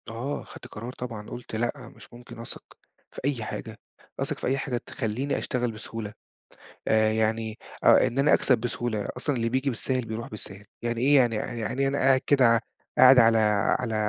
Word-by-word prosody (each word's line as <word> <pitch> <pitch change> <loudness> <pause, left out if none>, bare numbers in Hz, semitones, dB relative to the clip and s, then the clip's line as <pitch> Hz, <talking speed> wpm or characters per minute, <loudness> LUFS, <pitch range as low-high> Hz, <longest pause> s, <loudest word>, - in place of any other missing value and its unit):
آه، 120 +6 -4
خدت - - -12
قرار 120 +1 -8
طبعًا، 115 -5 -7
قلت 120 -2 -8
لأ، 120 +3 -3
مش - - -14
ممكن 120 -1 -12
أثق 115 - -6 0.5
في - - -9
أي 135 -5 -1
حاجة، - - -6 0.4
أثق - - -1
في - - -4
أي 135 +2 +1
حاجة 130 -2 -2
تخلّيني 125 +3 -3
أشتغل 125 -2 -1
بسهولة 105 -1 -7 0.7
آآ، 110 0 +3
يعني 110 0 -1 0.3
آآ، - - +6
إن 130 - -3
أنا 145 +2 +4
أكسَب 130 - +4
بسهولة، 120 -2 -2
أصلًا 140 +2 -1
اللي 115 -1 0
بييجي 130 +3 0
بالساهِل 130 +1 -1
بيروح 110 +1 -5
بالساهِل، 100 -1 -7 0.2
يعني 120 0 -2
إيه، 140 +3 +4
يعني 120 -4 +4
يعني 120 +4 -3
إيه 135 - +3
أنا 140 +1 -1
قاعد 135 -1 +4
كده، 125 -5 +5 0.4
قاعد 130 0 +8
على 115 -1 +5 0.4
على 115 -3 -2
120 Hz, 185 wpm, -26 LUFS, 110-130 Hz, 0.7 s, قاعد